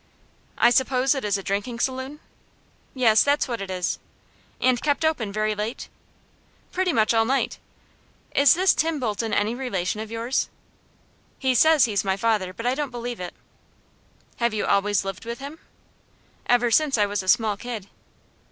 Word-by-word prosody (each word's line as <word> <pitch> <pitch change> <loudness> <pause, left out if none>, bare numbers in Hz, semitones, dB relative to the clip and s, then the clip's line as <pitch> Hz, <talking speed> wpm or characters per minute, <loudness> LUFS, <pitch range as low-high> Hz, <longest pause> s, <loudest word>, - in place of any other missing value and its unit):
"I 240 - +5
suppose 260 +1 +2
it 270 - -4
is 205 -1 +1
a 195 - -7
drinking 205 +5 -3
saloon?" 260 +3 -3 0.7
"Yes, 225 -4 +5
that's 285 +1 +2
what 235 -4 -4
it 195 - -6
is." 180 -1 -2 0.6
"And 255 -2 +2
kept 295 +1 +1
open 250 -10 0
very 215 +1 0
late?" 210 +3 -5 0.8
"Pretty 370 -1 0
much 220 -5 +2
all 225 0 +4
night." 265 +4 -1 0.7
"Is 280 0 +6
this 375 +2 +4
Tim 320 -1 0
Bolton 225 -2 -2
any 210 +2 +1
relation 210 -7 -2
of 220 - -7
yours?" 230 +3 -1 0.9
"He 260 -1 +1
says 310 +2 +5
he's 210 -4 0
my 190 -1 0
father; 210 -3 0
but 230 +5 -8
I 250 - +2
don't 290 0 -2
believe 240 -1 -5
it." 180 -1 -6 1.0
"Have 235 -2 0
you 210 - -1
always 200 0 +1
lived 195 -1 -5
with 235 +1 -5
him?" 285 +5 -9 0.9
"Ever 245 -1 +3
since 290 +1 +3
I 210 - +3
was 205 0 -2
a 185 - -11
small 220 0 +3
kid." 220 -2 -6
235 Hz, 170 wpm, -24 LUFS, 210-265 Hz, 1.0 s, Is